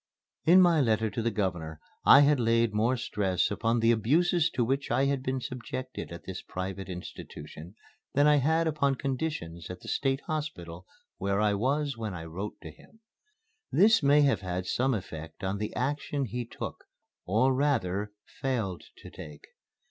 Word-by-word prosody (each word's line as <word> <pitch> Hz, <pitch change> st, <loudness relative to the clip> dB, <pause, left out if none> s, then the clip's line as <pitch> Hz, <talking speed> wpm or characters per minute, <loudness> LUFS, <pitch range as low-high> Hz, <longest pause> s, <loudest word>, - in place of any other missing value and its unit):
In 180 Hz, +3 st, +7 dB
my 170 Hz, -4 st, +5 dB
letter 110 Hz, -3 st, +1 dB
to 115 Hz, -, -2 dB
the 115 Hz, -, +1 dB
Governor 85 Hz, -7 st, -3 dB, 0.2 s
I 140 Hz, -, +8 dB
had 145 Hz, -1 st, +4 dB
laid 115 Hz, -1 st, +2 dB
more 115 Hz, +5 st, +2 dB
stress 95 Hz, -6 st, 0 dB
upon 115 Hz, +3 st, 0 dB
the 115 Hz, +1 st, +5 dB
abuses 160 Hz, -, +2 dB
to 120 Hz, -3 st, +2 dB
which 135 Hz, +3 st, -1 dB
I 135 Hz, -, +2 dB
had 140 Hz, -1 st, 0 dB
been 130 Hz, 0 st, -2 dB
subjected 130 Hz, -1 st, -6 dB
at 85 Hz, -, -8 dB
this 95 Hz, -1 st, -6 dB
private 95 Hz, +1 st, -5 dB
institution 85 Hz, -1 st, -9 dB, 0.4 s
than 145 Hz, +1 st, +5 dB
I 150 Hz, 0 st, +6 dB
had 160 Hz, +4 st, +2 dB
upon 140 Hz, -3 st, +1 dB
conditions 130 Hz, -, -4 dB
at 90 Hz, 0 st, -8 dB
the -, -, -12 dB
State 135 Hz, 0 st, 0 dB
Hospital 95 Hz, -, -5 dB, 0.3 s
where 100 Hz, +1 st, 0 dB
I 105 Hz, -1 st, +3 dB
was 135 Hz, +5 st, 0 dB
when 110 Hz, -4 st, -4 dB
I 80 Hz, -1 st, -7 dB
wrote 95 Hz, +6 st, -6 dB
to -, -, -8 dB
him. 225 Hz, -, -21 dB, 0.7 s
This 215 Hz, +3 st, +5 dB
may 145 Hz, +1 st, +5 dB
have 135 Hz, -9 st, +3 dB
had 90 Hz, -1 st, -3 dB
some 130 Hz, +6 st, +1 dB
effect 80 Hz, -5 st, -8 dB
on 95 Hz, +1 st, -2 dB
the 105 Hz, -, -3 dB
action 145 Hz, 0 st, -1 dB
he 120 Hz, +2 st, -4 dB
took, -, -, -7 dB, 0.4 s
or 115 Hz, +8 st, +3 dB
rather 105 Hz, -8 st, 0 dB
failed 115 Hz, -10 st, -3 dB, 0.2 s
to -, -, -10 dB
take. 75 Hz, -1 st, -11 dB
115 Hz, 170 wpm, -29 LUFS, 95-140 Hz, 0.7 s, I